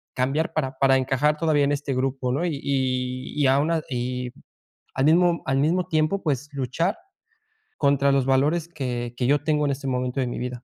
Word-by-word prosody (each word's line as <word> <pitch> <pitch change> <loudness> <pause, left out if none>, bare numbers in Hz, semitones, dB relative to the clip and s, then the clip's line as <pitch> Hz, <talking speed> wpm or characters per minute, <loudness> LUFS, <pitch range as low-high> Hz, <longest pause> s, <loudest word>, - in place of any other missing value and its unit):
cambiar 140 +6 0
para 135 -4 -2
para 135 -1 +5
encajar 135 +3 +1
todavía 155 -3 +2
en 140 - 0
este 140 -1 -2
grupo, 130 -1 -1
¿no? 145 +7 0
Y 165 -4 -1
y 130 -2 -1
y - - +4
a 135 +1 +4
una 160 +2 +1
y 125 0 -3 0.6
al 135 +1 +1
mismo 170 +1 +4
al 135 - +1
mismo 170 +5 +1
tiempo, 155 +5 +1
pues, 145 -2 -1
luchar 140 - -1 0.8
contra 140 -1 +3
los 135 -2 +2
valores 150 +5 +2
que 125 -6 -4
que 125 - 0
yo 145 +1 +2
tengo 150 -1 +1
en 140 - +1
este 140 +1 -5
momento 125 0 -1
de - - 0
mi 120 - -4
vida. 125 0 -5
135 Hz, 200 wpm, -24 LUFS, 130-155 Hz, 0.8 s, para